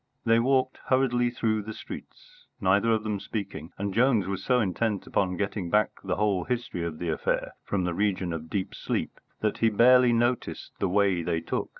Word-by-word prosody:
They 115 0 +5
walked 130 +1 +1
hurriedly 125 -2 +2
through 110 -3 0
the 110 +1 -7
streets, - - -11
neither 100 +4 +3
of 110 -1 +1
them 105 -2 -2
speaking; 100 -7 -5
and 100 0 -3
Jones 115 -3 +3
was 95 0 -4
so 125 -1 +3
intent 105 0 -1
upon 90 -2 0
getting 100 -3 -2
back 105 +4 +3
the 95 -2 -1
whole 100 -3 +1
history 120 -8 -3
of 85 -2 -4
the 85 0 -3
affair 80 - -1
from 95 -3 -1
the 90 -1 -1
region 95 -2 0
of 80 -1 -6
deep 95 -3 -2
sleep, - - -3 0.2
that 105 -1 0
he 115 - +4
barely 125 +3 +6
noticed 120 +1 0
the 100 - +1
way 95 -2 +2
they 85 0 -1
took. 80 - -3
105 Hz, 195 wpm, -27 LUFS, 95-120 Hz, 0.2 s, barely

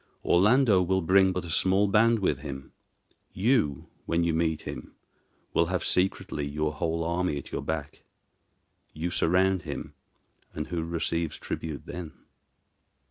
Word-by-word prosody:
Orlando 105 +2 +4
will 95 +1 +1
bring 95 +2 +5
but 90 -1 -3
a 85 - -6
small 95 +5 +3
band 115 +4 +4
with 90 -10 0
him: 70 -2 -8 0.6
you, 100 - +1 0.2
when 85 +1 +1
you 85 -1 +1
meet 80 -1 0
him, 60 - -8 0.6
will 85 - +3
have 90 +1 -1
secretly 90 -5 +1
your 75 +1 -2
whole 80 +2 -1
army 85 -2 -1
at 70 - -8
your - - -3
back. 80 -3 -4 0.9
You 85 +3 -3
surround 95 +3 +2
him, 75 -6 -6 0.6
and 75 - -3
who 85 -2 -2
receives 85 -1 -2
tribute 80 -3 -5
then?" 85 -3 -7
85 Hz, 140 wpm, -27 LUFS, 80-95 Hz, 0.9 s, bring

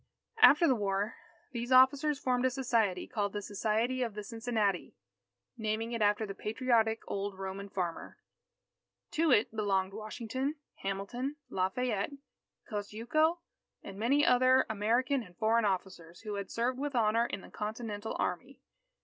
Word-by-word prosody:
After 335 -4 +8
the 265 - +5
war, 205 -2 -1 0.4
these 240 0 -4
officers 275 +3 +5
formed 250 -2 0
a 260 - +4
society, 230 -8 0
called 205 -3 -2
the 205 - -3
Society 220 +5 0
of 230 -4 -2
the 210 - -5
Cincinnati, 225 -4 -1 0.6
naming 220 +1 -2
it 230 -2 -3
after 210 +1 +3
the 200 - -6
patriotic 225 +1 +1
old 200 -1 -3
Roman 195 +1 -5
farmer. 175 -4 -4 0.9
To 325 +1 +2
it 225 -1 +3
belonged 195 -3 0
Washington, 230 +6 -3 0.2
Hamilton, 205 +9 -3 0.2
Lafayette, 205 +5 -1 0.5
Kosciuszko, 240 +11 0 0.4
and 195 0 -9
many 275 +7 +3
other 255 +1 +5
American 240 +6 +1
and 180 -6 -14
foreign 225 +1 +3
officers, 185 -3 -3
who 215 -2 -5
had 200 -1 -4
served 250 +2 -1
with 285 -1 -3
honour 230 0 +3
in 200 - -5
the - - -14
Continental 215 0 -4
army. 255 +10 -3
220 Hz, 140 wpm, -32 LUFS, 200-255 Hz, 0.9 s, After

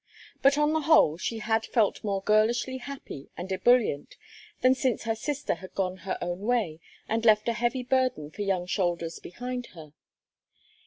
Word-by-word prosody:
But 275 +1 +5
on 295 +1 +3
the 315 - +2
whole 295 - +5
she 230 - -2
had 220 0 0
felt 225 -3 +1
more 200 -2 -1
girlishly 235 +5 +2
happy 260 - -8
and 185 +2 -6
ebullient 220 - +2 0.5
than 255 0 +6
since 260 -3 -1
her 225 -1 0
sister 290 +5 -2
had 185 - -11
gone 185 -1 -1
her 185 +1 -4
own 175 +1 -3
way 210 -7 0 0.3
and 225 +1 -1
left 215 -1 +4
a 235 - +2
heavy 240 +2 -1
burden 250 - 0
for 205 - -7
young 190 -3 0
shoulders 175 -3 -1
behind 245 +5 -6
her. 155 -2 -11
220 Hz, 170 wpm, -27 LUFS, 185-250 Hz, 0.5 s, than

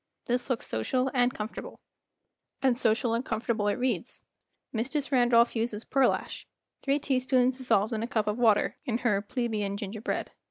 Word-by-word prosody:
This 245 +1 -1
looks 255 - -1
social 255 - 0
and 245 -1 +3
comfor 215 -1 -5
table. - - -8 0.8
And 260 -2 +4
social 230 0 +1
and 230 +2 0
comfortable 220 -2 -1
it 205 - +1
reads. 245 -4 -1 0.5
Mistress 275 +5 -1
Randolph 240 -2 +4
uses 225 -1 -1
pearlash—three 275 +1 -1
teaspoons 255 -2 +1
dissolved 220 -3 +2
in 220 - -1
a 230 - -2
cup 220 -3 0
of 210 +3 -2
water—in 230 +2 +2
her 210 -5 +1
"Plebeian 210 -3 -2
Ginger 205 +1 -6
Bread." 245 - -3
240 Hz, 155 wpm, -28 LUFS, 215-255 Hz, 0.8 s, And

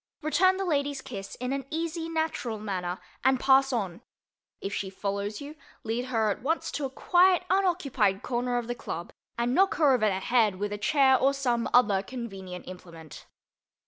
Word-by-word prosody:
Return 370 +5 +3
the 390 - -2
lady's 285 -4 0
kiss 205 -8 -7
in 250 +2 -3
an 275 0 -2
easy, 330 +1 -3
natural 315 -8 -2
manner 185 -4 -4 0.2
and 260 0 +3
pass 270 +1 +4
on. 200 -6 -2 0.6
If 195 - -5
she 195 - -3
follows 200 +2 -3
you, 290 +2 -8 0.3
lead 230 +2 -2
her 225 -4 +1
at - - -5
once 320 +7 -1
to 290 - -3
a - - -3
quiet 360 +6 +3
unoccupied 280 - +1
corner 245 0 -1
of 240 - -2
the 245 - -3
club 170 -7 -6 0.2
and 240 +1 0
knock 385 +6 +3
her 295 -4 +4
over 225 -4 +3
the 190 -2 0
head 220 -2 +2
with 205 +2 -3
a 205 - -5
chair 265 0 +4
or 275 +1 +3
some 245 -4 0
other 205 -6 +4
convenient 195 -6 -8
implement. 170 -4 -11
245 Hz, 180 wpm, -28 LUFS, 205-285 Hz, 0.6 s, pass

